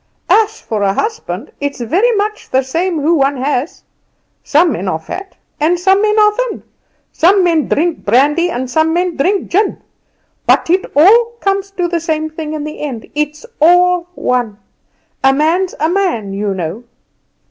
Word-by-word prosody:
As 440 Hz, 0 st, +3 dB
for 215 Hz, -2 st, -4 dB
a 195 Hz, -1 st, +1 dB
husband, 440 Hz, +1 st, -4 dB
it's 285 Hz, -1 st, -3 dB
very 360 Hz, -, +1 dB
much 425 Hz, +1 st, -3 dB
the 265 Hz, +1 st, +1 dB
same 330 Hz, +4 st, -2 dB
who 315 Hz, +4 st, +2 dB
one 275 Hz, -3 st, +1 dB
has. 270 Hz, +2 st, -2 dB, 0.6 s
Some 320 Hz, +3 st, +3 dB
men 190 Hz, -5 st, -4 dB
are 185 Hz, -, 0 dB
fat, 370 Hz, -, -8 dB, 0.2 s
and 335 Hz, +4 st, +1 dB
some 385 Hz, +2 st, +3 dB
men 425 Hz, 0 st, +1 dB
are 420 Hz, 0 st, +5 dB
thin; -, -, -3 dB, 0.5 s
some 370 Hz, +3 st, +3 dB
men 330 Hz, -4 st, +2 dB
drink 335 Hz, +2 st, 0 dB
brandy, 290 Hz, +10 st, +2 dB
and 260 Hz, -6 st, -3 dB
some 315 Hz, +5 st, +1 dB
men 350 Hz, 0 st, 0 dB
drink 375 Hz, +8 st, 0 dB
gin; 400 Hz, +3 st, +1 dB, 0.7 s
but -, -, +3 dB
it 370 Hz, +1 st, +2 dB
all 460 Hz, +9 st, +5 dB
comes 395 Hz, -1 st, -1 dB
to 355 Hz, -1 st, +1 dB
the 340 Hz, -1 st, -1 dB
same 315 Hz, -1 st, -2 dB
thing 310 Hz, -1 st, -6 dB
in 305 Hz, -1 st, -4 dB
the 305 Hz, 0 st, -7 dB
end; 260 Hz, -7 st, -6 dB
it's 300 Hz, +4 st, -3 dB, 0.2 s
all 355 Hz, +1 st, +4 dB
one. 240 Hz, -5 st, -1 dB, 0.7 s
A 270 Hz, -, +6 dB
man's 335 Hz, +6 st, +1 dB
a 315 Hz, -, +2 dB
man, 335 Hz, -, -1 dB
you 200 Hz, 0 st, -2 dB
know." 180 Hz, +6 st, -5 dB
325 Hz, 170 wpm, -15 LUFS, 275-375 Hz, 0.7 s, A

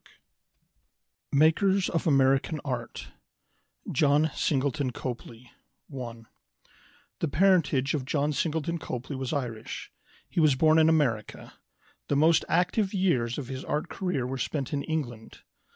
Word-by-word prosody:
] -, -, -51 dB
MAKERS 190 Hz, +4 st, +3 dB
OF 165 Hz, 0 st, -1 dB
AMERICAN 135 Hz, +2 st, +3 dB
ART 125 Hz, -4 st, -5 dB, 0.8 s
John 150 Hz, +2 st, +3 dB
Singleton 140 Hz, -1 st, 0 dB
Copley 120 Hz, -1 st, -7 dB, 0.4 s
ONE 120 Hz, -5 st, -7 dB, 0.9 s
The 165 Hz, -, 0 dB
parentage 155 Hz, -5 st, +2 dB
of 145 Hz, -4 st, -1 dB
John 145 Hz, +2 st, 0 dB
Singleton 160 Hz, +2 st, -1 dB
Copley 130 Hz, -1 st, -5 dB
was 130 Hz, -1 st, -4 dB
Irish. 125 Hz, -7 st, -4 dB, 0.4 s
He -, -, -2 dB
was 155 Hz, -4 st, +4 dB
born 155 Hz, +3 st, +4 dB
in 160 Hz, 0 st, +5 dB
America. 125 Hz, -10 st, 0 dB, 0.5 s
The 145 Hz, -, 0 dB
most 160 Hz, +3 st, +4 dB
active 190 Hz, +4 st, +1 dB
years 130 Hz, -12 st, +1 dB
of 140 Hz, -4 st, -5 dB
his 130 Hz, 0 st, -6 dB
art 150 Hz, +3 st, -2 dB
career 180 Hz, -10 st, -2 dB
were 130 Hz, +1 st, -4 dB
spent 140 Hz, 0 st, -3 dB
in 140 Hz, -, 0 dB
England. 120 Hz, -9 st, -5 dB
145 Hz, 130 wpm, -27 LUFS, 130-160 Hz, 0.9 s, in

